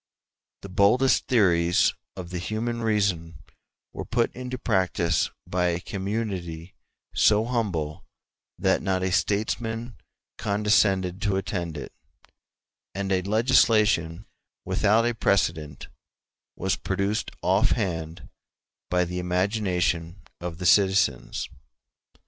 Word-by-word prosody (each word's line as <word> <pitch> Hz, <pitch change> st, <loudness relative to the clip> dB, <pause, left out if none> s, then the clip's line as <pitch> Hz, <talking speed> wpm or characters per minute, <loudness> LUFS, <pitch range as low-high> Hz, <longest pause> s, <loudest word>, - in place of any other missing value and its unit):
The 100 Hz, -, -8 dB
boldest 105 Hz, +8 st, +3 dB
theories 90 Hz, -7 st, +3 dB, 0.2 s
of 90 Hz, -2 st, -8 dB
the 90 Hz, -, -3 dB
human 115 Hz, +5 st, -3 dB
reason 100 Hz, -7 st, 0 dB, 0.6 s
were -, -, -5 dB
put 120 Hz, 0 st, 0 dB
into 130 Hz, +1 st, -5 dB
practice 95 Hz, -7 st, +1 dB, 0.2 s
by 90 Hz, 0 st, 0 dB
a 85 Hz, -1 st, 0 dB
community 95 Hz, -4 st, -4 dB, 0.4 s
so 105 Hz, +1 st, +4 dB
humble 95 Hz, -11 st, -2 dB, 0.5 s
that -, -, +2 dB
not 95 Hz, -1 st, 0 dB
a 95 Hz, -, 0 dB
statesman 110 Hz, +4 st, -1 dB, 0.5 s
condescended 100 Hz, -3 st, +1 dB
to 100 Hz, -2 st, +1 dB
attend 90 Hz, -4 st, -3 dB
to 75 Hz, -, -5 dB
it; -, -, -12 dB, 1.0 s
and 100 Hz, 0 st, -2 dB
a 95 Hz, -1 st, +2 dB
legislation 105 Hz, -, +2 dB, 0.4 s
without 110 Hz, +3 st, +2 dB
a 120 Hz, -, +1 dB
precedent 85 Hz, -, 0 dB, 0.7 s
was 95 Hz, +1 st, 0 dB
produced 100 Hz, +2 st, -1 dB
offhand 90 Hz, -, 0 dB, 0.6 s
by 90 Hz, 0 st, +2 dB
the 90 Hz, +1 st, -4 dB
imagination 90 Hz, -1 st, -1 dB, 0.2 s
of 85 Hz, -1 st, -5 dB
the 90 Hz, -, -5 dB
citizens. 95 Hz, -8 st, +2 dB
95 Hz, 110 wpm, -25 LUFS, 90-110 Hz, 1.0 s, so